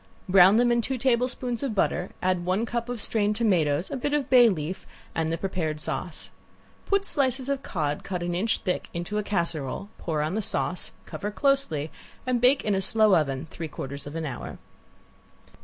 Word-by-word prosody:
Brown 190 +2 +7
them 240 0 +4
in 235 0 +3
two 260 +3 -2
tablespoons 245 -1 0
of 265 -6 -2
butter, 180 -2 0
add 185 -1 +1
one 185 +5 0
cup 235 0 -3
of 245 -2 -3
strained 210 0 +1
tomatoes, 175 -8 +1
a - - -2
bit 290 +3 -1
of 285 -3 -2
bay 245 -2 +8
leaf, 170 -1 -4 0.3
and 160 0 -1
the 165 - -1
prepared 170 -5 -2
sauce. - - -3 0.6
Put 400 0 +2
slices 265 -3 +2
of 275 -1 -1
cod 150 - -2
cut 180 -2 -3
an 175 0 -2
inch 205 +6 0
thick 180 -3 -2
into 175 +5 -2
a - - -2
casserole, 170 -3 -2
pour 155 -3 -1
on 155 +3 -2
the 220 - 0
sauce, 180 -2 -1
cover 205 - -5
closely, 210 - 0 0.3
and 250 -2 0
bake 255 +3 +4
in 210 - +2
a 190 - +1
slow 215 0 +5
oven 140 -2 0
three 165 - -5
quarters 140 0 -7
of 145 - -8
an 165 -1 -3
hour. 135 - -6
195 Hz, 190 wpm, -26 LUFS, 165-240 Hz, 0.6 s, bay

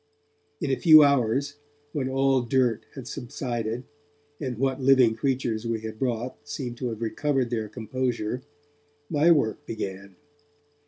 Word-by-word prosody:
In 150 -5 -1
a 135 - 0
few 155 -3 +9
hours, 140 +1 +2 0.4
when 135 -3 -1
all 135 0 +2
dirt 120 -2 +1
had 130 -3 -8
subsided, 120 -2 -4 0.6
and 130 -5 -4
what 135 +1 0
living 130 -3 +5
creatures 120 -2 -1
we 115 -1 -1
had 110 0 -7
brought 125 -1 -2
seemed 120 -4 -5
to 125 - -3
have 115 0 -5
recovered 130 +1 0
their 110 -3 -2
composure, 120 +1 -3 0.7
my 155 +2 +4
work 145 -10 +2
began. 100 -3 -6
125 Hz, 140 wpm, -26 LUFS, 115-135 Hz, 0.7 s, few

